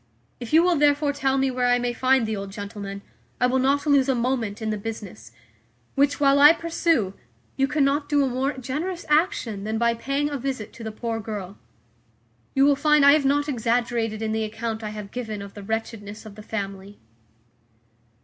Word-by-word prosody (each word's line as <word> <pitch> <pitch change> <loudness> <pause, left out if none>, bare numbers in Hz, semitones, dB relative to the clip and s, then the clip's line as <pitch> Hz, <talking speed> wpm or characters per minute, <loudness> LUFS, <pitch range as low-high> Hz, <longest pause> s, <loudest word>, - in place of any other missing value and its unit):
If 240 -2 -7
you 320 +2 +6
will 355 -1 +3
therefore 290 0 +3
tell 270 -1 0
me 270 0 +1
where 250 -1 0
I 245 0 +4
may 245 0 -1
find 260 0 +2
the 220 0 -2
old 195 -1 -6
gentleman, 200 -1 -7 0.4
I - - +3
will 255 +1 +2
not 275 +3 +1
lose 280 -2 +3
a 265 - +3
moment 235 -3 -1
in 220 -1 -2
the 215 - -2
business; 205 - -8 0.6
which, 280 +1 +2
while 280 -1 +4
I 295 +3 +9
pursue, 330 - 0 0.4
you 270 0 +2
cannot 285 0 +1
do 290 -1 +3
a - - +1
more 260 +3 -1
generous 300 +8 -4
action 300 - +1
than 220 +1 -2
by 235 0 +2
paying 275 +5 -2
a 285 - -3
visit 255 -5 -4
to 230 - -10
the 220 - -4
poor 225 +1 -4
girl. 205 -3 -6 1.0
You 270 0 +5
will 285 0 +5
find 300 0 +4
I 280 - +9
have 300 -2 +2
not 290 +2 +2
exaggerated 230 -3 -1
in 220 - -1
the 220 0 -1
account 220 +1 -4
I 215 - -3
have 210 -2 -8
given 220 -4 -5
of 200 0 -9
the 205 - -9
wretchedness 220 0 -5
of 215 - -10
the 215 - -11
family." 200 -2 -6
245 Hz, 200 wpm, -24 LUFS, 215-280 Hz, 1.0 s, I